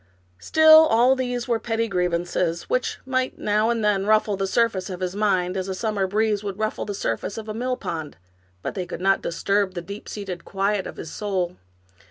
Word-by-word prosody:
Still 315 - +7
all 245 +2 +4
these 245 -2 -2
were 235 -2 +1
petty 225 0 -1
griev 180 -3 0
ances, 170 0 -1
which 255 - -1
might 255 -1 -1
now 210 +2 +1
and 230 -2 0
then 200 -1 +1
ruffle 215 -1 +3
the 195 0 -1
surface 205 -3 +1
of 180 -2 -5
his 185 0 -3
mind, 190 -4 +1
as 190 0 -2
a 190 - -3
summer 205 -1 -1
breeze 210 +1 0
will 200 -1 -3
ruffle 215 +2 -2
the 205 - -4
surface 115 - -3
of 220 -1 -6
a 215 - -4
mill 250 +3 -2
pond, 160 -3 -5 0.5
but - - -3
they 185 -3 -4
could - - -6
not 195 +1 +2
disturb 195 +2 0
the - - -2
deep 200 +3 -8
seated 190 -4 -6
quiet 200 0 -1
of - - -9
his 160 - -7
soul. 185 -4 -2
205 Hz, 210 wpm, -24 LUFS, 185-225 Hz, 0.5 s, Still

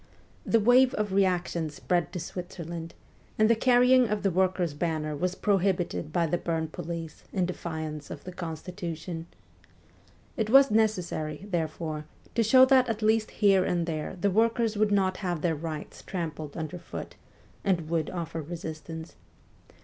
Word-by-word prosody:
The 230 - +4
wave 250 +4 +5
of 210 -2 -1
reaction 180 -4 +1
spread 175 +2 -1
to 180 - -4
Switzerland, 170 -1 -6 0.4
and 215 - +5
the 230 - +5
carrying 250 +1 +5
of 210 -1 -1
the 195 - +2
workers' 180 -2 +1
banner 155 -1 -2
was 180 +5 -1
prohibited 190 -6 0
by 170 +1 +2
the 170 +2 0
Bern 160 -2 -2
police 165 0 -6
in 185 -2 +1
defiance 160 -4 -5
of - - -8
the 180 - -7
constitution. 170 -1 -6 1.1
It 220 -3 0
was 270 +1 +7
necessary, 180 -7 0
therefore, 160 -3 -3 0.3
to 235 - +2
show 255 +4 +7
that 260 -2 +4
at 225 -1 -2
least 220 0 +3
here 195 -3 +4
and 175 -2 0
there 160 +2 -4
the 200 +2 +2
workers 225 +2 +2
would 210 0 +2
not 190 -2 +2
have 175 -5 -3
their 170 - +2
rights 155 0 -6
trampled 155 -5 -5
underfoot, 165 +2 -6 0.5
and 170 -5 +1
would 160 -2 0
offer 165 -2 -4
resistance. 160 0 -7
175 Hz, 150 wpm, -28 LUFS, 160-210 Hz, 1.1 s, was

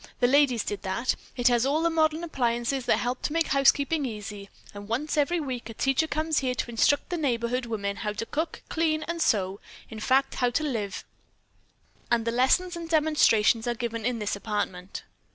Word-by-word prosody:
The 245 - +3
ladies 255 -3 +4
did 205 - -4
that. 195 +6 -1 0.2
It 245 0 +3
has 240 -1 +3
all 290 +4 +1
the 335 - +2
modern 315 0 +1
appliances 245 -3 -1
that - - +4
help 250 +1 -2
to 295 - -2
make 330 -1 +1
housekeeping 280 +2 +3
easy, 210 -4 -6 0.2
and 205 0 -9
once 260 +8 -2
every 310 +4 +2
week 255 -6 -5
a 225 - -8
teacher 270 +6 +1
comes 310 0 0
here 255 -2 -1
to 240 - -3
instruct 285 +8 +2
the 350 - -1
neighborhood 245 -4 -1
women 200 -3 -3
how 210 -2 -3
to 220 - -4
cook, 315 +7 -4
clean 315 -1 0
and 340 +1 -4
sew; 200 -9 +1 0.3
in 220 - -7
fact, 270 +4 +2
how 245 - +4
to 245 +6 -1
live. 220 -9 -3 1.1
And 235 -1 +1
the 230 - 0
lessons 265 +9 +2
and 335 -1 -7
demonstrations 295 -8 +3
are 240 - 0
given 230 -1 -4
in 245 +1 0
this 210 -2 -2
apartment." 200 -3 -4
250 Hz, 195 wpm, -27 LUFS, 225-305 Hz, 1.1 s, ladies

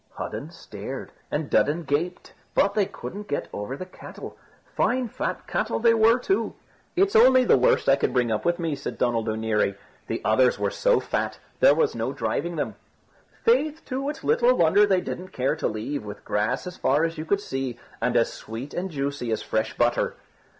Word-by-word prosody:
Hudden - - -5
stared, - - -8 0.2
and 150 0 -2
Dudden 155 +5 +2
gaped; 160 +5 -2 0.2
but 200 +1 +3
they 205 -2 +2
couldn't 205 +1 -8
get 145 - -2
over 105 +7 -4
the 185 - -6
cattle; 185 - -10 0.4
fine 250 0 +1
fat - - -4
cattle - - -1
they 230 0 +5
were 225 +1 +5
too. 385 +10 -1 0.4
"It's 390 +2 +2
only 255 +2 +7
the - - +6
worst 125 -1 +3
I 135 0 +6
could - - 0
bring 125 -2 +1
up 110 - -1
with 175 0 +1
me," 165 -3 -1
said 140 - -6
Donald 115 -2 0
O'Neary; 110 -2 0 0.3
"the - - -2
others 125 +4 +4
were - - -1
so - - +3
fat, - - -2 0.2
there - - +6
was 455 -2 +2
no - - -2
driving - - -2
them. - - -3 0.7
Faith, 320 -10 +2
too, 270 +2 -2
it's 300 - -6
little 245 +1 +4
wonder 180 +5 +5
they 190 -2 +3
didn't 180 +1 -5
care 130 +1 0
to - - -1
leave, 110 +5 -3
with 105 0 -9
grass 110 - 0
as 180 0 -7
far 145 +4 +2
as 165 -1 -1
you - - -2
could 200 +4 +1
see, 135 - -4 0.2
and 120 +1 +2
as 115 - +2
sweet 115 +6 -7
and 185 +2 -3
juicy 140 -5 -3
as 110 - -1
fresh 110 0 -1
butter." 120 0 +1
160 Hz, 195 wpm, -25 LUFS, -, 0.7 s, only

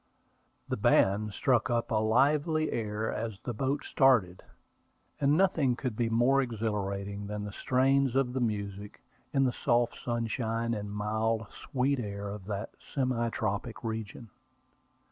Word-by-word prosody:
The - - -2
band 105 +2 +3
struck 125 +3 +1
up 120 -1 0
a 110 - +2
lively 150 +7 +2
air 110 0 -2
as 110 -4 -4
the 120 - -3
boat 135 +6 -1
started; 120 -10 +3 0.8
and 145 +2 +3
nothing 160 -9 +3
could 125 -3 -3
be 115 0 0
more 120 +4 +4
exhilarating 100 -4 -3
than 105 0 -4
the 105 - -5
strains 130 +3 +2
of 135 -2 +1
the 130 - -1
music, 100 -3 -3 0.3
in 135 - +3
the 125 -2 +1
soft 120 -2 +1
sunshine 115 0 -1
and 105 -2 -4
mild, 110 +2 -1
sweet 135 +1 -1
air 100 -2 -4
of 100 -2 -7
that 100 +1 -4 0.2
semi 125 -4 +1
tropical 110 +2 -3
region. 110 0 -6
115 Hz, 145 wpm, -30 LUFS, 105-130 Hz, 0.8 s, more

